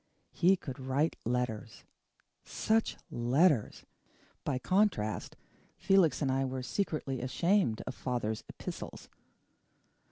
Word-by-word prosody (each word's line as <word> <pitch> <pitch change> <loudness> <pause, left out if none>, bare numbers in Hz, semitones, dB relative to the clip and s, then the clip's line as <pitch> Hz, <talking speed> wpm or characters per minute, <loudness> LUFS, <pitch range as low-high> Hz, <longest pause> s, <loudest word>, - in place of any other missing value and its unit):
He 185 +2 +4
could 135 -8 -7
write 135 +4 0
letters. 120 -2 -2 0.6
Such 225 0 0
letters! 125 - +2 0.6
By 135 - 0
contrast, 180 - +1 0.4
Felix 175 -7 +3
and 135 - +1
I 135 +1 +1
were 130 -1 -3
secretly 140 -6 -2
ashamed 170 - +1
of 130 - -4
father's 120 -5 -2
epistles. - - -7
130 Hz, 100 wpm, -32 LUFS, 125-175 Hz, 0.6 s, He